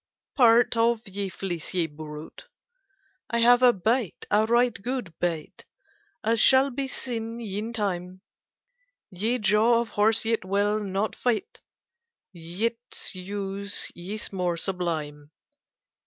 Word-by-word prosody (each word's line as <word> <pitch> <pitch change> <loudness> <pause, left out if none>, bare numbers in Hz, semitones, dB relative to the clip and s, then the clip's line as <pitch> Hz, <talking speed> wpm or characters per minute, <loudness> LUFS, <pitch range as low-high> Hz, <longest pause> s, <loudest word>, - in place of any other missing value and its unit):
Parte 240 -3 +5
of 230 -1 +2
ye 195 0 -4
fleecye 175 -2 -3
brute. 150 0 -9 0.8
I 235 - 0
have 240 +1 +6
a 250 -1 +7
bytte—a 215 0 0
ryghte 240 -1 +2
good 245 -6 -3
bytte— 165 -3 -3 0.6
As 225 +1 +2
shall 265 +1 +6
bee 270 +2 -3
seene 230 -3 -5
yn 215 0 -4
tyme. 185 -4 -3 0.9
Ye 215 +7 0
jawe 215 +2 +3
of 235 - -5
horse 220 +2 +2
yt 225 -2 +1
wyll 205 +3 +1
not 200 +1 -2
fytte; 310 - -2 0.7
Yts 220 +8 -4
use 200 +1 -4
ys 200 +5 -6
more 180 -2 0
sublyme. 160 -6 -3
210 Hz, 115 wpm, -26 LUFS, 185-235 Hz, 0.9 s, a